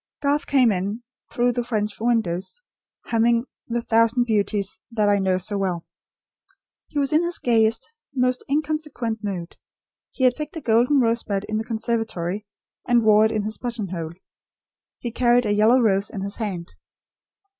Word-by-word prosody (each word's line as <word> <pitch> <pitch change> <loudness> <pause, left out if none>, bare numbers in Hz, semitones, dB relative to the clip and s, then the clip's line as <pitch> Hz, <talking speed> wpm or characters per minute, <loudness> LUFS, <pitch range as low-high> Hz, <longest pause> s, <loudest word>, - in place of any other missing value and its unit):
Garth 285 +1 +1
came 255 -5 +4
in, 200 +5 -2 0.3
through 245 0 +2
the 245 0 -2
French 215 -3 -2
window, 225 -7 +1 0.7
humming 235 +1 +2 0.2
"The 235 0 -2
thousand 230 +2 +3
beauties 205 -3 0
that 215 -3 +1
I 205 0 +3
know 190 -1 +2
so 200 +2 -3
well." 180 -4 -2 1.0
He - - -8
was 280 0 +1
in 315 +3 +4
his 345 0 -2
gayest, 225 - +1 0.2
most 250 -1 0
inconsequent 290 -6 -2
mood. 185 -4 -5 0.5
He 260 - -4
had 250 -1 +5
picked 300 +1 -6
a - - -5
golden 245 +4 +3
rosebud 230 -4 0
in 215 - -1
the 220 - -1
conservatory 220 -4 -2 0.4
and 240 -2 +4
wore 215 0 +6
it 220 - +1
in 215 -2 -1
his 215 +1 -4
buttonhole. 190 -9 -4 0.8
He 240 - -5
carried 245 0 +3
a 205 - +1
yellow 220 +5 +5
rose 200 -4 +2
in 195 - -6
his 200 +2 -4
hand. 190 -7 -4
225 Hz, 160 wpm, -23 LUFS, 205-245 Hz, 1.0 s, wore